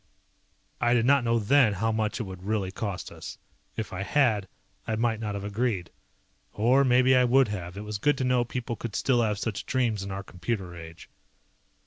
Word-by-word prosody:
I 120 Hz, 0 st, +3 dB
did 115 Hz, -1 st, +2 dB
not 140 Hz, 0 st, +4 dB
know 115 Hz, 0 st, +2 dB
then 115 Hz, +1 st, +4 dB
how 115 Hz, +4 st, 0 dB
much 110 Hz, -1 st, -1 dB
it -, -, -1 dB
would 95 Hz, -3 st, -8 dB
really 100 Hz, -1 st, -1 dB
cost 100 Hz, -2 st, -5 dB
us. -, -, -9 dB, 0.4 s
If 110 Hz, -3 st, -4 dB
I 95 Hz, -, -4 dB
had 110 Hz, -4 st, +2 dB, 0.4 s
I 110 Hz, -, 0 dB
might 115 Hz, 0 st, 0 dB
not 105 Hz, -2 st, -3 dB
have 100 Hz, -, -5 dB
agreed. 105 Hz, -3 st, -2 dB, 0.6 s
Or 125 Hz, +6 st, +4 dB
maybe 130 Hz, 0 st, +4 dB
I 125 Hz, -, +5 dB
would 125 Hz, 0 st, +4 dB
have, 90 Hz, -2 st, -5 dB
it 105 Hz, -, -5 dB
was 105 Hz, -1 st, -5 dB
good 145 Hz, +5 st, +2 dB
to 130 Hz, -, -1 dB
know 125 Hz, -1 st, +2 dB
people 120 Hz, 0 st, -4 dB
could 115 Hz, -1 st, -6 dB
still 125 Hz, -3 st, +2 dB
have 105 Hz, -3 st, 0 dB
such 105 Hz, -1 st, -3 dB
dreams 120 Hz, -6 st, 0 dB
in 100 Hz, -, -5 dB
our 95 Hz, 0 st, -5 dB
computer 90 Hz, -1 st, -4 dB
age. 80 Hz, 0 st, -11 dB
110 Hz, 200 wpm, -27 LUFS, 100-125 Hz, 0.6 s, I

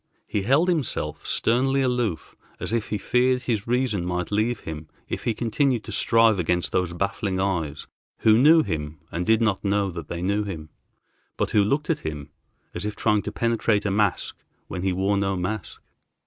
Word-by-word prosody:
He 105 Hz, -, -1 dB
held 135 Hz, -, +3 dB
himself 160 Hz, -9 st, -1 dB
sternly 135 Hz, +3 st, +2 dB
aloof, 120 Hz, -8 st, -1 dB, 0.2 s
as -, -, -3 dB
if 115 Hz, -2 st, 0 dB
he 105 Hz, -, -2 dB
feared 125 Hz, +4 st, +2 dB
his 110 Hz, -4 st, -1 dB
reason 120 Hz, -6 st, +1 dB
might 90 Hz, +1 st, -2 dB
leave 110 Hz, +3 st, 0 dB
him 80 Hz, 0 st, -7 dB, 0.2 s
if -, -, -5 dB
he 115 Hz, -, +1 dB
continued 125 Hz, 0 st, +1 dB
to -, -, -8 dB
strive 115 Hz, -3 st, +3 dB
against 90 Hz, +1 st, 0 dB
those 90 Hz, -2 st, 0 dB
baffling 95 Hz, +1 st, -2 dB
eyes, 80 Hz, -7 st, -1 dB, 0.4 s
who 110 Hz, -1 st, +6 dB
knew 155 Hz, +7 st, +6 dB
him 75 Hz, -, -4 dB
and 85 Hz, +2 st, -3 dB
did 110 Hz, +1 st, +4 dB
not 105 Hz, -4 st, +1 dB
know 100 Hz, -1 st, +1 dB
that 85 Hz, -3 st, -7 dB
they 85 Hz, +1 st, -4 dB
knew 100 Hz, +3 st, +1 dB
him, 80 Hz, -6 st, -6 dB, 0.7 s
but -, -, -1 dB
who 105 Hz, -, +4 dB
looked 145 Hz, +9 st, 0 dB
at 155 Hz, -, -1 dB
him 75 Hz, -, -6 dB, 0.4 s
as -, -, -4 dB
if 105 Hz, 0 st, -3 dB
trying 105 Hz, 0 st, +2 dB
to -, -, -5 dB
penetrate 115 Hz, -3 st, +1 dB
a 100 Hz, -, +1 dB
mask 100 Hz, -1 st, 0 dB, 0.3 s
when 90 Hz, -, -5 dB
he 95 Hz, 0 st, +1 dB
wore 95 Hz, +2 st, +1 dB
no 95 Hz, 0 st, 0 dB
mask. 95 Hz, +2 st, -4 dB
105 Hz, 190 wpm, -24 LUFS, 90-120 Hz, 0.7 s, who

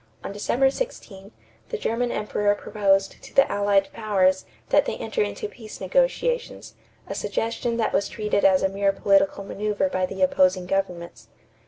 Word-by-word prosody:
On -, -, -5 dB
December 245 Hz, +6 st, +1 dB
16, 210 Hz, -, -6 dB, 0.4 s
the 455 Hz, -, -3 dB
German 240 Hz, -, -1 dB
Emperor 210 Hz, -1 st, 0 dB
proposed 195 Hz, -2 st, 0 dB
to -, -, -14 dB
the 275 Hz, -, +6 dB
Allied 200 Hz, -1 st, +1 dB
Powers 190 Hz, -4 st, +1 dB, 0.2 s
that -, -, +4 dB
they -, -, -2 dB
enter 455 Hz, -, -2 dB
into 430 Hz, 0 st, -2 dB
peace 220 Hz, -, -11 dB
negotiations, -, -, -1 dB, 0.3 s
a -, -, -4 dB
suggestion 230 Hz, +1 st, -2 dB
that 225 Hz, -, 0 dB
was 200 Hz, -, +1 dB
treated 210 Hz, -2 st, -1 dB
as 190 Hz, -1 st, +4 dB
a -, -, +4 dB
mere 195 Hz, 0 st, +1 dB
political 195 Hz, 0 st, +2 dB
maneuver 210 Hz, +7 st, -1 dB
by 185 Hz, -7 st, -1 dB
the 190 Hz, 0 st, -2 dB
opposing 185 Hz, 0 st, +3 dB
governments. 175 Hz, -11 st, -3 dB
200 Hz, 160 wpm, -24 LUFS, 195-230 Hz, 0.4 s, the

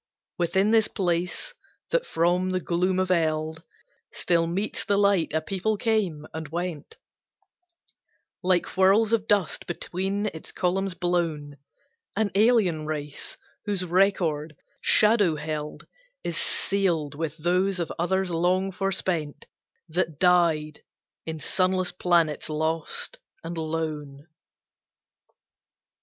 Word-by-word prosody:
Within 190 Hz, +4 st, +2 dB
this 225 Hz, -1 st, +5 dB
place, 180 Hz, -, -2 dB, 0.4 s
that -, -, +1 dB
from 175 Hz, +2 st, +1 dB
the 185 Hz, 0 st, 0 dB
gloom 180 Hz, +2 st, 0 dB
of 185 Hz, 0 st, +1 dB
Eld 160 Hz, -2 st, 0 dB, 0.5 s
Still 170 Hz, -1 st, +1 dB
meets 190 Hz, +5 st, -2 dB
the 200 Hz, -, +1 dB
light, 200 Hz, -4 st, +3 dB
a 160 Hz, +1 st, 0 dB
people 195 Hz, +6 st, -1 dB
came 200 Hz, -10 st, 0 dB
and 160 Hz, -1 st, -5 dB
went 175 Hz, -, -5 dB, 1.4 s
Like 180 Hz, -1 st, +2 dB
whirls 200 Hz, +4 st, +4 dB
of 220 Hz, -1 st, +1 dB
dust 200 Hz, -5 st, +1 dB
between 190 Hz, +4 st, -2 dB
its 160 Hz, -, -7 dB
columns 190 Hz, +1 st, -1 dB
blown 165 Hz, -5 st, -1 dB, 0.6 s
An 205 Hz, -1 st, +1 dB
alien 195 Hz, -8 st, +3 dB
race, 150 Hz, -2 st, -4 dB, 0.3 s
whose 200 Hz, -3 st, -1 dB
record, 170 Hz, -5 st, +1 dB, 0.3 s
shadow 210 Hz, -6 st, +4 dB
held, 150 Hz, 0 st, -5 dB, 0.4 s
Is -, -, -3 dB
sealed 175 Hz, -7 st, 0 dB
with 160 Hz, +1 st, -4 dB
those 180 Hz, +3 st, +1 dB
of 170 Hz, -, -2 dB
others 190 Hz, +1 st, +1 dB
long 180 Hz, +3 st, +1 dB
forespent 180 Hz, -5 st, -1 dB, 0.4 s
That 165 Hz, -2 st, -1 dB
died 165 Hz, -4 st, +3 dB, 0.5 s
in 160 Hz, 0 st, -3 dB
sunless 185 Hz, +2 st, +1 dB
planets 170 Hz, -4 st, +1 dB
lost 160 Hz, +1 st, -2 dB, 0.2 s
and 165 Hz, +1 st, -5 dB
lone. 155 Hz, -3 st, -4 dB
175 Hz, 115 wpm, -26 LUFS, 160-195 Hz, 1.4 s, this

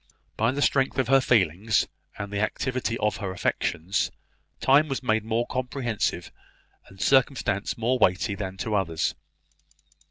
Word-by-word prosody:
By 115 Hz, +2 st, +2 dB
the 145 Hz, +2 st, 0 dB
strength 135 Hz, -1 st, +2 dB
of 130 Hz, -3 st, +1 dB
her 135 Hz, 0 st, +6 dB
feelings, 105 Hz, -2 st, +2 dB, 0.3 s
and 100 Hz, 0 st, -6 dB
the 100 Hz, -, -1 dB
activity 125 Hz, +1 st, -1 dB
of 105 Hz, -2 st, 0 dB
her 100 Hz, -4 st, -4 dB
affections, 95 Hz, 0 st, -1 dB, 0.5 s
time 140 Hz, +3 st, +4 dB
was 135 Hz, -2 st, -3 dB
made 110 Hz, -3 st, +1 dB
more 115 Hz, +2 st, 0 dB
comprehensive, 125 Hz, -3 st, -2 dB, 0.6 s
and 95 Hz, -, -16 dB
circumstance 130 Hz, -3 st, +1 dB
more 120 Hz, +3 st, +1 dB
weighty 90 Hz, -1 st, +2 dB
than 95 Hz, -2 st, -5 dB
to 110 Hz, +2 st, -3 dB
others. 85 Hz, -6 st, 0 dB
110 Hz, 145 wpm, -26 LUFS, 100-130 Hz, 0.6 s, her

